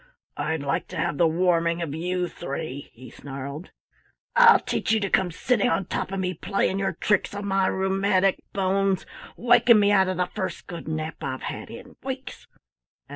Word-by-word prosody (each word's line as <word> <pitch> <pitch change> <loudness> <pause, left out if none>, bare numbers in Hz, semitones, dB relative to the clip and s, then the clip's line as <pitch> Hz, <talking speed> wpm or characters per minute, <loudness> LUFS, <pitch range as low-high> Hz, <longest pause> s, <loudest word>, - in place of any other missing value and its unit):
"I'd 160 -2 -2
like 140 - -1
to - - -8
have 145 - -1
the 170 - +5
warming 170 0 +1
of 145 -4 -4
you 180 +3 -1
three," 140 -3 -6
he 125 0 -13
snarled. 140 +4 -7 0.7
"I'll 470 -2 +8
teach - - -2
you 220 - +3
to 200 -2 -2
come 190 -2 +3
sitting 245 +8 +1
on 195 - 0
top - - -3
of 195 - -2
me 185 -1 -1
playing 195 0 -1
your 195 -1 0
tricks 205 +4 0
on 200 0 -4
my 195 -1 +2
rheumatic 190 0 +1
bones 195 -1 +1 0.3
waking 240 -1 +5
me 205 0 +4
out 190 -2 +4
of 185 -1 -2
the 180 - +2
first 190 +1 -5
good 170 -2 -8
nap 155 0 -4
I've 130 -1 -4
had - - -5
in - - -11
weeks! - - -7
185 Hz, 180 wpm, -25 LUFS, 160-195 Hz, 0.7 s, I'll